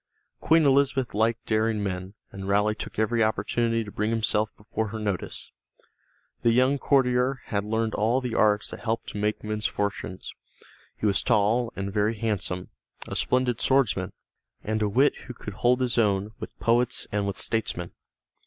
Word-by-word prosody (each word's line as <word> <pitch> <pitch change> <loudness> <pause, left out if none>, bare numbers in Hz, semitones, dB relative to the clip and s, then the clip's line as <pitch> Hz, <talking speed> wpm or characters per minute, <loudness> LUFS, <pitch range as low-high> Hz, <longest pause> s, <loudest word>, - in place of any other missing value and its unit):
Queen 160 -1 +4
Elizabeth 135 -2 +2
liked 110 +2 +1
daring 110 -1 +1
men, 95 0 -4 0.2
and 95 0 -7
Raleigh 105 +2 +2
took - - -8
every 115 +1 +2
opportunity 115 +2 0
to 105 - -9
bring 105 +2 -1
himself 110 -1 +1
before 110 +1 -3
her 110 +2 -5
notice. 100 -5 -4 0.9
The 115 - +3
young 130 +4 +3
courtier 130 -1 +2
had 100 -2 -1
learned 110 +1 -1
all 115 +4 +2
the 125 -3 -4
arts 105 -1 +2
that - - -7
helped 115 -1 -2
to 105 - -6
make 105 +1 -1
men's 105 0 0
fortunes. 100 -2 -4 0.6
He - - -3
was 100 -2 +3
tall 115 +2 +2
and 100 0 -4
very 105 +1 +1
handsome, 105 -5 -2 0.4
a - - -5
splendid 125 -2 +1
swordsman, 100 -9 +2 0.5
and 110 +1 -1
a 105 - +2
wit 135 +8 +3
who 125 - -7
could 105 - -8
hold 125 +4 +2
his 125 -1 +1
own 100 -1 +1
with - - -9
poets 120 +2 +2
and 100 -1 0
with 100 - -3
statesmen. 100 -6 -1
110 Hz, 170 wpm, -26 LUFS, 105-120 Hz, 0.9 s, Queen